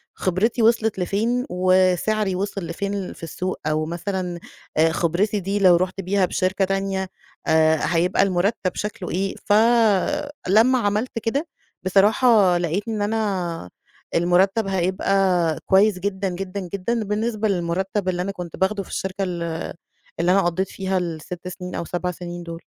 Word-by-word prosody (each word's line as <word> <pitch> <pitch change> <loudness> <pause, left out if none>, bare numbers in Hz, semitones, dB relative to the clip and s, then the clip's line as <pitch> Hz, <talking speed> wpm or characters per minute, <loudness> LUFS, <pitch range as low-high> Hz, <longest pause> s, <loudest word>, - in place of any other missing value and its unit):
خبرتي 205 +6 0
وصلت 225 -2 +2
لفين، 225 +7 0
وسعري 185 +2 +2
وصل 200 +1 -3
لفين 200 +3 -3
في - - -16
السوق 185 +3 -4
أو 155 0 0
مثلًا 175 +1 -3 0.5
خبرتي 180 +6 0
دي 195 +2 -2
لو 185 -3 +6
رُحت 185 +2 -1
بيها 195 +1 +1
بشركة 185 +2 0
تانية 195 0 -2 0.4
آآ، 160 0 +4
هيبقى 175 +3 +2
المرتب 190 0 0
شكله 210 -3 -4
إيه؟ 195 +2 -2
ف 205 - +2 0.9
لما 230 +7 +5
عملت 215 +2 -1
كده، 270 +8 -1 0.4
بصراحة 200 0 +4
لقيت 175 +5 -2
إن 220 -2 -2
أنا 200 -6 -2 0.5
المرتب 190 +5 +3
هيبقى 185 -2 +1
كويس 195 0 +4
جدًا، 195 0 -2
جدًا، 185 +2 -5
جدًا 220 +4 -1
بالنسبة 215 +1 -1
للمرتب 190 +1 -1
اللي 180 -1 -1
أنا 195 +2 -2
كنت 180 -3 -8
باخده 195 +1 0
في - - -16
الشركة 190 +1 -3
ال 170 -2 -3 0.6
اللي 175 +2 +3
أنا 195 - +5
قضيت 180 +2 0
فيها 190 -1 -2
ال6 170 +1 -5
سنين 180 0 -7
أو - - -3
7 180 +1 -2
سنين 175 0 -7
دول. 170 0 -8
190 Hz, 145 wpm, -22 LUFS, 175-205 Hz, 0.9 s, لو